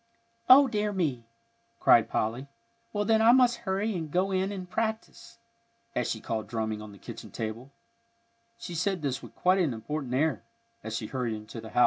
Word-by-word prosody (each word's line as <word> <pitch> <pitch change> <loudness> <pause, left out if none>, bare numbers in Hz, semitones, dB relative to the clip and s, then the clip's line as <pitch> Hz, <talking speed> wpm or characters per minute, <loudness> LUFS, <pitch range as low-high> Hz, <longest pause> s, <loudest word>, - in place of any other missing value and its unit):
"O 270 +2 +9
dear 210 -3 -1
me!" 145 - -2 0.5
cried 115 -1 +5
Polly. 120 +6 -1 0.4
"Well, 205 0 -1
then, 220 +1 +4
I 225 +1 +7
must 245 -2 +5
hurry 200 +3 0
and 160 -3 -4
go 185 +5 +1
in 190 +1 0
and 185 -2 -6
practise," 220 +3 -4 0.6
as - - -1
she 110 - -2
called 110 0 -3
drumming 110 -2 -3
on 105 -1 -9
the 100 - -13
kitchen - - -9
table; 115 +5 -5 0.9
she 200 -6 -7
said 180 0 -1
this 135 -2 -1
with - - -12
quite 185 +1 +3
an 155 -10 +1
important 130 +2 -4
air, 155 +4 +1 0.4
as 110 0 -4
she 115 - -3
hurried 120 -1 -2
into 110 +2 -8
the 110 - -9
house. - - -1
155 Hz, 185 wpm, -28 LUFS, -, 0.9 s, O